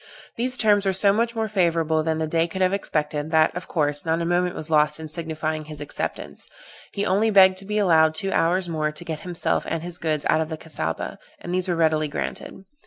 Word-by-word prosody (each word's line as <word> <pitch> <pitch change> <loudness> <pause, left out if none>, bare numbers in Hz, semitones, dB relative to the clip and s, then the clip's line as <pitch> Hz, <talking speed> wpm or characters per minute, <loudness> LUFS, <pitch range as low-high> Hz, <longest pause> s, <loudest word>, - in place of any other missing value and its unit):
These 255 +2 +2
terms 205 -3 +3
were 190 - +2
so 195 +1 +4
much 230 +2 0
more 220 -1 -1
favorable 165 -6 +1
than 160 0 -1
the 160 - -1
Dey 165 +1 +1
could 190 +3 -2
have 185 +1 +2
expected, 150 -5 -2
that, 160 0 +3
of 180 - -6
course, 145 -3 -1
not 165 0 0
a 170 - -2
moment 175 +1 0
was 155 +1 -6
lost 150 0 +3
in 160 - -6
signifying 155 -1 -4
his 150 -1 -9
acceptance: 145 - -5 0.4
he 200 - -2
only 205 +4 +2
begged 190 -2 +6
to 195 - -2
be 210 +1 -2
allowed 160 -6 +4
two 195 +4 -1
hours 180 +2 +2
more 155 -2 -1
to 155 +3 -10
get 160 -2 -4
himself 175 0 -1
and 165 0 -3
his 175 0 -5
goods 155 -2 -1
out 160 - +3
of 160 - -3
the 160 - -5
Cassaubah, 80 - -5 0.2
and 175 - -5
these 185 0 0
were 175 - 0
readily 155 -2 +2
granted. 190 +5 -6
165 Hz, 230 wpm, -23 LUFS, 155-190 Hz, 0.4 s, begged